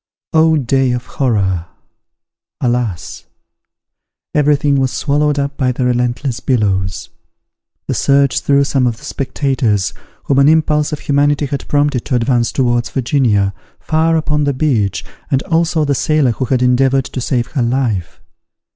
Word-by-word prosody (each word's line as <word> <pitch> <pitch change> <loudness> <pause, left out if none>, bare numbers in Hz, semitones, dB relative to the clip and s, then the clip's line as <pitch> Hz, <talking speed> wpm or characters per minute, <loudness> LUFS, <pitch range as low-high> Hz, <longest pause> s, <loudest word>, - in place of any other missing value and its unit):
Oh, 160 0 +4
day 135 -1 +1
of 125 0 -4
horror! 95 -9 -1 0.9
Alas! 120 -8 -3 1.1
every 150 0 +3
thing 145 -1 +1
was 130 -1 +1
swallowed 145 +2 0
up 140 0 -2
by 130 -2 +1
the 125 0 -2
relentless 125 +1 -1
billows. 95 -8 -1 0.8
The - - -1
surge 140 -1 +2
threw 140 0 +2
some 135 -2 +1
of 115 -2 -2
the - - -17
spectators, 125 - -1 0.3
whom 140 -1 +1
an 140 +1 +5
impulse 155 -1 +2
of 150 - -4
humanity 145 +1 +1
had 140 0 -5
prompted 145 -4 +1
to 125 - -1
advance 120 -1 +1
towards 120 -2 0
Virginia, 115 -7 +1 0.3
far 160 +1 +1
upon 150 -2 0
the 140 - +1
beach, 110 - 0 0.2
and 135 -2 +1
also 165 -1 +1
the 145 - +1
sailor 145 -1 +1
who 130 +3 -3
had 125 0 0
endeavoured 130 +1 +2
to 130 - -5
save 120 -1 -1
her 140 - -1
life. 115 -8 -1
135 Hz, 150 wpm, -16 LUFS, 120-145 Hz, 1.1 s, an